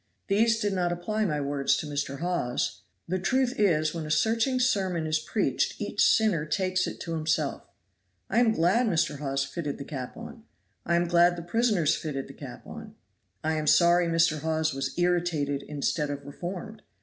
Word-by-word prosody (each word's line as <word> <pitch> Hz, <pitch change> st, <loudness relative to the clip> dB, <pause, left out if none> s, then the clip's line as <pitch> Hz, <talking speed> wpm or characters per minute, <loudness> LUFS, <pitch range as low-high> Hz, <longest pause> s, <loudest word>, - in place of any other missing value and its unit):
These 225 Hz, +3 st, +3 dB
did 205 Hz, -3 st, 0 dB
not 180 Hz, -2 st, 0 dB
apply 215 Hz, +5 st, -1 dB
my 150 Hz, -6 st, -1 dB
words 140 Hz, -1 st, +1 dB
to -, -, -4 dB
Mr. 145 Hz, -1 st, -4 dB
Hawes. 175 Hz, -9 st, -1 dB, 0.3 s
The 185 Hz, +2 st, -1 dB
truth 260 Hz, +6 st, +1 dB
is 155 Hz, -7 st, +2 dB
when 165 Hz, -2 st, -4 dB
a -, -, -7 dB
searching 225 Hz, -, +2 dB
sermon 190 Hz, -9 st, +1 dB
is 155 Hz, 0 st, +1 dB
preached 205 Hz, +7 st, -1 dB
each -, -, 0 dB
sinner 210 Hz, -9 st, +3 dB
takes 185 Hz, +3 st, 0 dB
it -, -, -6 dB
to 165 Hz, -, -4 dB
himself. 155 Hz, -1 st, -1 dB, 0.6 s
I -, -, +2 dB
am 240 Hz, -2 st, +4 dB
glad 220 Hz, +6 st, +2 dB
Mr. 160 Hz, -6 st, 0 dB
Hawes 135 Hz, -1 st, -1 dB
fitted 145 Hz, 0 st, -4 dB
the 140 Hz, -, -7 dB
cap 130 Hz, -4 st, -6 dB
on. 230 Hz, 0 st, -9 dB, 0.5 s
I 170 Hz, -, +2 dB
am 175 Hz, 0 st, +2 dB
glad 175 Hz, 0 st, +4 dB
the 170 Hz, -, -7 dB
prisoners 200 Hz, -4 st, +2 dB
fitted 135 Hz, -4 st, -4 dB
the -, -, -11 dB
cap -, -, -10 dB
on. -, -, -10 dB, 0.5 s
I 160 Hz, +1 st, +1 dB
am 155 Hz, -1 st, -2 dB
sorry 175 Hz, +2 st, +5 dB
Mr. 165 Hz, -2 st, +2 dB
Hawes 160 Hz, +1 st, 0 dB
was 135 Hz, +2 st, -4 dB
irritated 175 Hz, -5 st, 0 dB
instead 150 Hz, +1 st, -2 dB
of 140 Hz, -1 st, -5 dB
reformed. 180 Hz, +8 st, -7 dB
170 Hz, 185 wpm, -27 LUFS, 150-195 Hz, 0.6 s, sorry